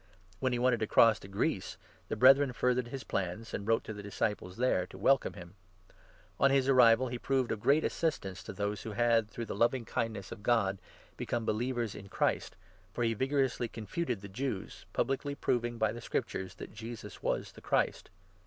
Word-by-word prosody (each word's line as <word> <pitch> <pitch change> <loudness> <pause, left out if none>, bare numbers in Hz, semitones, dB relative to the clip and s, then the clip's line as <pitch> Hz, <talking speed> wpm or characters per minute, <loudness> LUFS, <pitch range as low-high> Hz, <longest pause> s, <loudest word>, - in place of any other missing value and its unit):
When 130 - +1
he 120 - 0
wanted 120 -1 +2
to 110 - -1
27 - - -26
cross 115 -2 +7
to - - -11
Greece, 100 +1 -2 0.3
the - - -2
Brethren 135 +1 +6
furthered 125 0 +1
his 135 +2 -6
plans, 95 +4 -3
and 100 - -4
wrote 115 0 +2
to 110 - -6
the 105 - -7
disciples 100 -2 -3
there 115 -7 +1
to 95 - -12
welcome 135 +8 +3
him. 85 -1 -11 0.9
On 140 - +5
his 135 -1 +3
arrival 125 -1 +6
he 120 0 -4
proved 130 -2 0
of 110 - -2
great 140 +7 +3
assistance 95 - -2
to - - -5
those 105 0 -2
who 110 - -6
had, 115 -1 +3
through 115 - -5
the - - -5
loving 120 +1 +1
kindness 110 -5 -3
of 115 - -8
God, 100 -4 +2 0.4
become 120 -2 -2
believers 120 0 -1
in 100 -1 -10
Christ, - - 0 0.4
for 120 - -2
he 115 -1 +2
28 - - -9
vigorously 135 -3 +1
confuted 115 - -3
the 100 - -8
Jews, 105 0 -5
publicly 140 +2 -1
proving 120 -3 -1
by 110 -1 +2
the 120 - -7
Scriptures 95 -3 -3
that - - -9
Jesus 115 -1 -8
was - - -1
the - - -14
Christ. - - 0
115 Hz, 200 wpm, -32 LUFS, 105-130 Hz, 0.9 s, cross